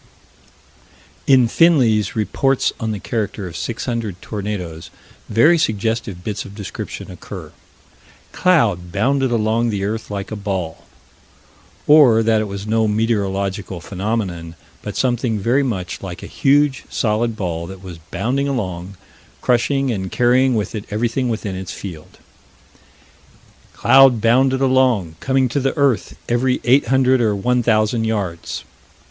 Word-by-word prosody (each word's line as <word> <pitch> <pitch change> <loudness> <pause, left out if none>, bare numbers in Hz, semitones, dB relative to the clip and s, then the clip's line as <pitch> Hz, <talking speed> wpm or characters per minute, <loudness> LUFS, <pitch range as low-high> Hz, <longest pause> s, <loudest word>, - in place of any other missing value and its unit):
In 130 -3 +5
Finley's 120 - +3
Reports 135 +5 +1
on 110 - -2
the 105 - -4
Character 105 -2 -3
of 85 -2 -8
600 115 -4 -4
Tornadoes 95 -7 -5 0.4
very 160 +9 +4
suggestive 110 - -1
bits 105 -1 -3
of 100 - -12
description 100 -3 -7
occur: - - -9 0.8
"Cloud 105 - +2
bounded 130 +7 +1
along 115 0 +1
the 100 -3 -2
earth 110 +2 -4
like 100 0 -5
a - - -3
ball" 95 -6 -4 1.0
Or 135 -7 +6
that 110 -1 +2
it - - -2
was 100 0 -6
no 110 0 +1
meteorological 100 -3 -1
phenomenon, 95 -3 -4 0.3
but 105 - -6
something 120 -3 0
very 120 +7 +2
much 100 -10 -3
like 90 -2 -7
a - - -6
huge 140 -1 +2
solid 115 +1 0
ball 85 -4 -3
that 95 0 -10
was 90 -3 -9
bounding 130 +7 -1
along, 95 -7 -4 0.4
crushing 130 +2 +1
and 95 -4 -4
carrying 125 +1 +3
with 105 -3 -2
it 105 -2 -5
everything 120 +4 -1
within 110 -4 -3
its 95 0 -6
field 85 -6 -9 1.6
"Cloud 135 -3 +5
bounded 130 +4 +3
along, 130 -11 +2
coming 130 -1 +1
to 140 - -1
the 135 +3 -1
earth 140 -5 +1
every 125 +2 +1
eight 130 +1 +4
hundred 130 0 +3
or 110 -3 +2
one 125 +5 +1
thousand 110 0 +1
yards." 100 -7 -3
110 Hz, 135 wpm, -19 LUFS, 100-125 Hz, 1.6 s, Or